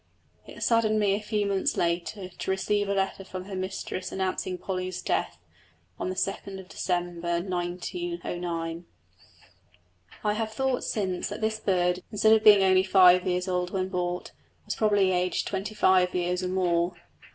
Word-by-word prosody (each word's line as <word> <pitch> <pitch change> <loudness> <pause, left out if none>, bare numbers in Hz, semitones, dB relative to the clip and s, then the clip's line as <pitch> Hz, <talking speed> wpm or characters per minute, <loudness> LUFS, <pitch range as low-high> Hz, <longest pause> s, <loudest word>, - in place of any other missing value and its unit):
It - - -7
saddened 220 -2 +3
me 205 -2 +3
a 205 - -1
few 210 -1 -1
months 195 -1 0
later 175 +3 -1
to 185 - -7
receive 205 +1 0
a 200 - +1
letter 195 0 -1
from 185 -1 -7
her 195 -1 -6
mistress 185 0 -4
announcing 185 -1 -2
Polly's 185 -1 -4
death, - - -1 0.6
on - - -2
2nd 190 0 -3
December 175 -2 -2
1909. 175 - -4 1.4
I 210 -1 +2
have 220 0 -2
thought 265 -1 0
since 190 -4 -2
that 205 - -5
this 220 0 0
bird, 180 -3 +1
instead 220 +1 +4
of 220 -1 +4
being 205 -2 +8
only 185 0 +5
five 185 -1 +6
years 180 0 0
old 180 -1 -1
when 185 0 -2
bought, 180 -1 -3 0.3
was - - -2
probably 205 -3 +3
aged 180 0 0
twenty 210 +3 -4
five 185 -3 +3
years 180 0 0
or 185 - -2
more. 175 -1 +1
185 Hz, 155 wpm, -27 LUFS, 180-205 Hz, 1.4 s, being